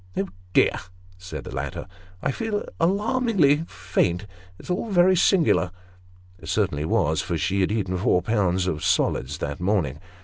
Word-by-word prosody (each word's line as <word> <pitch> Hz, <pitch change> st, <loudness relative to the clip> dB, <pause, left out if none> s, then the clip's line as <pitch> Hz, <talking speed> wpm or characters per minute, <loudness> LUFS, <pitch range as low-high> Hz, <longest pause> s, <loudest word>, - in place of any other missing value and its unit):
" -, -, -15 dB
Oh 95 Hz, -, -1 dB, 0.2 s
dear! -, -, +3 dB, 0.2 s
" 90 Hz, -, -25 dB
said 90 Hz, 0 st, -7 dB
the -, -, -8 dB
latter, -, -, -4 dB, 0.2 s
" 90 Hz, 0 st, -24 dB
I 140 Hz, -, +1 dB
feel 210 Hz, -, -3 dB
alarmingly 195 Hz, -, +2 dB
faint; 90 Hz, +1 st, -1 dB, 0.3 s
it's -, -, -7 dB, 0.2 s
very 185 Hz, -1 st, +5 dB
singular." 170 Hz, -, +3 dB, 0.7 s
(It -, -, -8 dB
certainly 75 Hz, +1 st, 0 dB
was, 80 Hz, 0 st, +1 dB
for 85 Hz, -, -2 dB
she 100 Hz, +4 st, 0 dB
had 95 Hz, -, +1 dB
eaten 95 Hz, -4 st, -1 dB
four 90 Hz, -2 st, +2 dB
pounds 95 Hz, -4 st, +1 dB
of 80 Hz, -4 st, -2 dB
solids 65 Hz, +3 st, +1 dB
that 70 Hz, +1 st, -4 dB
morning.) 90 Hz, -7 st, 0 dB
95 Hz, 165 wpm, -24 LUFS, -, 0.7 s, very